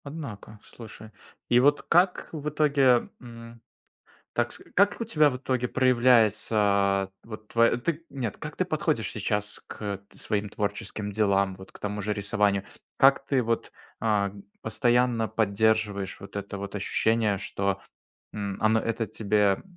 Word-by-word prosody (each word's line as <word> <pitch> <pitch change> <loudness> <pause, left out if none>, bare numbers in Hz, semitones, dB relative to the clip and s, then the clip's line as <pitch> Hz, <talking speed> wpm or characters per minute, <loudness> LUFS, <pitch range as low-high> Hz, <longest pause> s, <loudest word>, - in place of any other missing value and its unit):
Однако, 135 -8 -8
слушай. 110 -1 -12 0.4
И 120 - +5
вот 145 +3 +3
как 180 +2 +2
в 150 -2 -4
итоге, 140 -5 +3
м, 115 -1 -11 0.7
так - - 0
с - - -9
как 200 +3 +3
у - - 0
тебя 155 -9 +3
в 125 - -4
итоге 125 -1 -1
проявляется 110 -6 +3
вот 110 -1 -10
тв - - -17 0.3
ты 165 +1 -2
Нет, 125 -7 -4
как - - -7
ты - - +1
подходишь - - -1
сейчас 105 0 -2
к 100 -2 -5
т - - -19
своим 105 -1 -2
творческим 105 0 -4
делам, 100 -2 +2
вот 95 0 -13
к - - -15
тому 105 0 -4
же 105 +1 -1
рисованию? 100 -1 0 0.3
Как 135 0 +5
ты 135 -2 +1
вот, 115 0 -2 0.3
а, 105 -3 +1 0.3
постоянно 120 0 +1
поддерживаешь 110 -2 0
вот 100 - -11
это 100 0 -5
вот 100 +1 -7
ощущение, 105 +1 +1
что, 100 +1 -2 0.5
м, 100 -2 -4
он 110 +1 +4
это 115 0 -1
тебе 105 -1 +1
110 Hz, 150 wpm, -27 LUFS, 100-125 Hz, 0.7 s, И